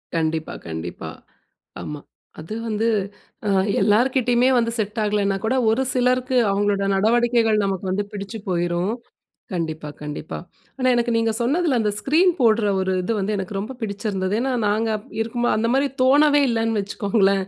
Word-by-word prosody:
கண்டிப்பா. 160 -1 -1
கண்டிப்பா. 80 +2 -6 0.7
ஆமா, 150 -1 -6 0.4
அது 190 +8 -7
வந்து 220 +1 0 0.6
அ, - - +1 0.3
எல்லார்கிட்டயுமே 245 +2 +3
வந்து, 230 -1 +1
செட் 215 +1 -2
ஆகலனா 205 -1 +1
கூட, 255 +4 +1
ஒரு 230 +4 +2
சிலருக்கு, 255 0 +1
அவங்களோட 200 0 +1
நடவடிக்கைகள் 230 +1 +3
நமக்கு 195 0 -2
வந்து, 205 +2 0
பிடிச்சு 205 +2 -6
போயிரும். 175 +3 0 0.6
கண்டிப்பா, 160 -3 -3
கண்டிப்பா. 150 +1 -6 0.4
ஆனா, 255 0 +1
எனக்கு 240 0 +1
நீங்க 225 -1 +1
சொன்னதுல, 280 +1 +1
அந்த 210 -1 +1
ஸ்கிரீன் 345 +6 +3
போட்ற 225 -2 +4 0.2
ஒரு 190 0 0
இது 225 +5 -1
வந்து, 210 +2 -1
எனக்கு 195 +1 -5
ரொம்ப 235 +6 -5
பிடிச்சிருந்தது. 200 -2 -2
ஏன்னா 265 0 -1
நாங்க 220 +2 +1
அப் 210 - -12
இருக்கும்போது 240 +1 0
அந்த 230 +1 +1
மாரி 275 +1 +2
தோணவே 290 +2 +5
இல்லன்னு 225 -2 0
வச்சுக்கோங்களேன். 200 -1 +1
215 Hz, 150 wpm, -22 LUFS, 195-240 Hz, 0.7 s, தோணவே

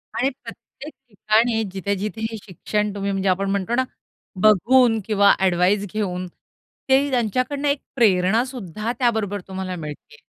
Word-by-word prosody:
आणि 265 - +1
प्रत्येक 300 +3 -11 0.2
ठिकाणी 220 +2 +1
जिथे-जिथे 200 +3 -3
हे 225 - -6
शिक्षण 210 +2 -2
तुम्ही 200 0 -2
म्हणजे 195 0 0
आपण 195 +2 0
म्हणतो 200 +3 -1
ना, 260 - +2 0.6
बघून 225 +3 +4
किंवा 200 -2 +4
ॲडव्हाइस 190 +2 +2
घेऊन 185 -4 -2 0.6
ते 275 +2 +4
त्यांच्याकडनं 255 +4 0
एक 280 0 +1 0.2
प्रेरणा 215 -2 +3
सुद्धा 220 - -5
त्याबरोबर 220 -5 0
तुम्हाला 190 -1 -5
मिळती 150 -4 -9
आहे. - - -23
210 Hz, 140 wpm, -22 LUFS, 190-240 Hz, 0.6 s, बघून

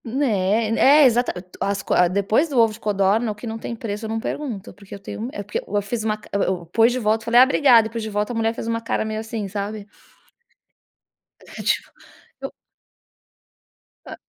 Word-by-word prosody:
É, 225 -4 0 0.3
é - - +7
exatamente, 230 -7 +1
as 200 0 -1
qua 180 - +3
depois 200 - +1
do 275 - -3
ovo 225 -2 +4
de 220 - -12
codorna 210 +2 +1
o - - -7
que 210 - -10
não 225 0 -5
tem 235 - -5
preço 220 -1 -5
eu - - -5
não 225 0 -2
pergunto, 230 -5 -5
porque 200 -1 -12
eu - - -10
tenho 195 - -8
me 235 - -4
é 205 - -6
porque 205 - -4
eu 205 0 0
fiz 220 +2 -3
uma 215 -1 -1
ca 215 - -17
eu 200 - +1
eu 180 -2 -1
pus 225 +8 +3
de 250 - -2
volta 220 -2 0
falei: 235 +1 +4
"Ah - - +10
obrigada.", 260 -4 +5
eu - - -13
pus 230 0 -4
de 220 - -5
volta, 210 +3 -2
a - - -6
mulher 225 0 0
fez - - -6
uma 230 0 -2
cara 230 - -2
meio 215 0 -3
assim, 220 -2 -5
sabe? 205 +1 -5 1.7
E - - -5
tipo, - - 0 0.5
eu - - -5 1.6
É. - - -8
220 Hz, 220 wpm, -22 LUFS, 205-230 Hz, 1.7 s, Ah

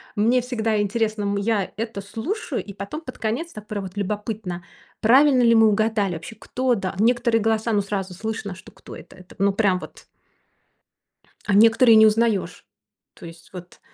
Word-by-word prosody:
мне 230 +4 +3
всегда 225 -4 -1
интересно, 215 0 -1
м, 200 0 -1
я 200 -1 -1
это 225 -2 -4
слушаю, 225 - -4
и 205 - -10
потом 200 +12 -7
под 255 -5 -10
конец, 240 +11 -3
так 210 0 -10
прям 210 -3 -4
вот 190 +2 -9
любопытно, 205 -3 -4 0.4
правильно 260 +3 +5
ли 230 -1 +5
мы 225 0 +6
угадали 215 -2 +1
вообще, 170 +6 -8
кто, 255 +1 -1
да. 190 -2 -4
Некоторые 235 0 +2
голоса, 225 +1 0
ну, 205 - +2
сразу 195 -2 -4
слышно, 205 0 -5
что 185 - -15
кто - - -13
это. - - -13
Это, 185 0 -16
ну, 200 +1 +3
прям 195 -3 +1
вот - - -13 1.4
А 205 - 0
некоторые 225 +2 +6
не 220 0 +8
узнаёшь. 220 -2 0 0.5
То - - -12
есть 165 0 -14
вот, 180 -1 -11
215 Hz, 175 wpm, -22 LUFS, 200-230 Hz, 1.4 s, не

